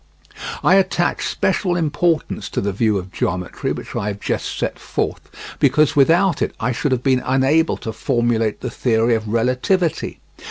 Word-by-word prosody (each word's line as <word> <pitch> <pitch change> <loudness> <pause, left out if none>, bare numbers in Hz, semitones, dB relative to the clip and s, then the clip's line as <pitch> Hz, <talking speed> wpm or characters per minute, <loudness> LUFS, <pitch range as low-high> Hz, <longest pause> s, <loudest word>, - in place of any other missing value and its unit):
I 190 - +5
attach 180 -2 +1
special 185 -1 0
importance 165 0 0
to - - -2
the 100 - -1
view 105 +1 +1
of 95 0 -6
geometry 90 -1 -2
which - - -6
I 100 - -2
have 100 -1 -4
just - - -3
set - - -3
forth, - - -3 0.4
because 150 +3 +3
without 165 +5 +4
it - - -1
I 125 +1 0
should 135 +3 -1
have 125 -1 0
been 130 -2 +2
unable 135 +5 +2
to 110 - -6
formulate 115 -3 0
the 125 - -4
theory 115 -1 +1
of 110 -1 -1
relativity. 125 - 0
125 Hz, 165 wpm, -20 LUFS, 110-160 Hz, 0.4 s, I